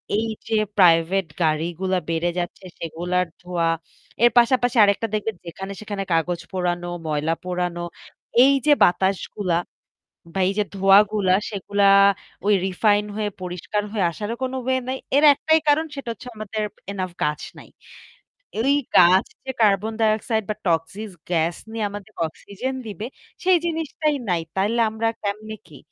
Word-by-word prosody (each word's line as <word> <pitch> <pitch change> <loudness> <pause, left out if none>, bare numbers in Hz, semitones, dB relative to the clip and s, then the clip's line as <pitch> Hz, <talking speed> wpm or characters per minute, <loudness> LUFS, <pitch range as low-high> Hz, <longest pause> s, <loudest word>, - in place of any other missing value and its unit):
এইযে 225 0 -3 0.2
প্রাইভেট 175 +1 +4 0.2
গাড়িগুলা 170 +4 0
বেড়ে 165 +1 0
যাচ্ছে 175 +2 -5
সেগুলার 175 +3 -1 0.2
ধোয়া। 175 -2 -1 0.6
এর 240 - +8
পাশাপাশি 245 0 +4
আরেকটা 205 +2 +2
দেখবেন 215 -1 -1
যেখানে 190 +4 -7
সেখানে 205 -2 -4
কাগজ 170 +1 0
পোড়ানো, 175 -1 -1 0.2
ময়লা 155 +1 0
পোড়ানো, 180 -1 -2 0.6
এইযে 275 +2 +4
বাতাসগুলা 190 0 +1 0.8
বা 190 - -1
এই - - 0
যে 210 - +3
ধোঁয়া 195 +1 +6
গুলা 195 -3 +2 0.2
সেগুলা 200 0 -1 0.6
ওই 210 - +5
রিফাইন 205 +2 +2
হয়ে 210 -1 -1
পরিষ্কার 180 +3 -3
হয়ে 200 -5 0
আসারও 210 +7 -4
কোনো 260 0 -2
ওয়ে 260 0 +2
নাই। 260 0 -2 0.2
এর 290 - +5
একটাই 315 +3 +2
কারণ 315 +2 +3
সেটা 275 -4 -7
হচ্ছে 250 +3 -11
আমাদের 215 0 -4 0.3
enough 185 -3 -4
গাছ 150 0 0 0.2
নাই। - - -13 0.9
এই 270 +5 +3 0.2
গাছ 185 +2 +6 0.2
যে 265 - -2
কার্বন 210 +1 +3
ডাইঅক্সাইড 220 0 +1
বা 210 - -1
টক্সিক 175 +6 -1 0.2
গ্যাস 170 -1 +1 0.2
নিয়ে 225 -2 -2
আমাদের 205 +1 -9 0.2
অক্সিজেন 225 +10 -6
দিবে 210 +2 -6 0.4
সেই 370 -1 +5
জিনিসটাই 315 -2 -1
নাই। 175 -2 +1
তাইলে 210 +5 +1
আমরা 220 +1 -2
কেমনে 215 +1 -4
কি? 150 -4 -14
200 Hz, 145 wpm, -23 LUFS, 175-220 Hz, 0.9 s, এর